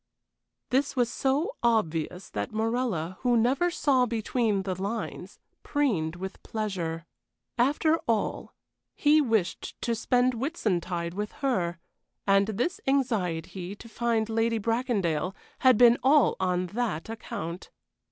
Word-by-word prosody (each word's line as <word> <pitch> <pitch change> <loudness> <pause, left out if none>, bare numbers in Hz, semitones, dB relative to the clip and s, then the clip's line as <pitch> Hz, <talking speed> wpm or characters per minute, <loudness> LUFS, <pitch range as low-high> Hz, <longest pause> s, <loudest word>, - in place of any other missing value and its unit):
This 270 +3 +1
was 245 -2 +1
so 275 +5 0
obvious 180 -6 0
that 100 0 -3
Morella, 220 -6 -1
who 245 -2 +3
never 265 +10 +2
saw 270 -7 +2
between 220 -2 0
the 190 -1 -2
lines, 200 +5 -5 0.2
preened 200 - 0
with 190 +2 -7
pleasure. 175 -7 -3 0.5
After 300 +5 +3
all, 225 -3 -1 0.4
he 305 +1 +4
wished 220 -9 -1
to 235 - +1
spend 250 +2 +2
Whitsuntide 185 - -2
with 210 +2 -4
her, 180 -9 0 0.5
and 195 0 +4
this 250 - -2
anxiety 190 - -1
to 230 - -12
find 230 -1 0
Lady 225 +1 +1
Bracondale 200 - 0 0.2
had 255 -3 +5
been 240 0 +6
all 280 +1 +5
on 180 -1 +1
that 225 -9 -2
account. 185 -6 -6
225 Hz, 125 wpm, -28 LUFS, 185-250 Hz, 0.5 s, been